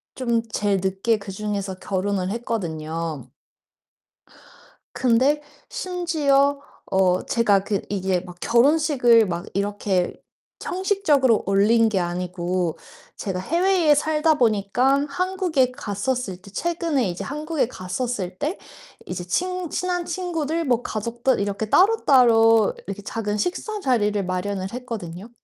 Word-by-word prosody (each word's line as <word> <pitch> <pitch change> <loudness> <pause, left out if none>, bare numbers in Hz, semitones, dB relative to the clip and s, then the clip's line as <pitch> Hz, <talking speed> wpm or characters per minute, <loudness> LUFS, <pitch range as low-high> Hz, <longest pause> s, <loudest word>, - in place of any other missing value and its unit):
좀 235 -3 0
제일 205 -2 +1
늦게 195 +4 +1
그중에서 200 -1 -4
결혼을 190 -1 -1
했거든요. 165 - -4 1.7
근데 260 +5 +2 0.3
심지어 310 - +1 0.3
어 185 -1 +2
제가 205 -5 +2
그 200 -2 -1
이게 190 -2 0
막 180 -1 -11
결혼식을 245 -3 +4
막 175 -2 -3
이렇게 200 -2 -1 0.5
형식적으로 335 - +2
올린 215 +4 +4
게 195 - +1
아니고 175 -1 -2 0.4
제가 190 -3 -3
해외에 340 - +3
살다보니깐 275 -4 +2
한국에 345 -5 0
갔었을 240 -3 -3
때 200 - -14
최근에 325 - -1
이제 175 - -5
한국에 300 -2 -2
갔었을 185 -2 -4
때 310 +6 -2 0.5
이제 180 0 -5
친 365 - -1
친한 355 +1 -2
친구들 335 -3 -2
뭐 245 -4 +1
가족들 235 +3 -1
이렇게 200 +2 -2
따로따로 235 - +5
이렇게 200 +1 -6
작은 210 0 -3
식사 405 - -2
자리를 210 - +1
마련을 185 +1 -3
했거든요. 220 -6 -6
230 Hz, 265 characters per minute, -23 LUFS, 195-295 Hz, 1.7 s, 따로따로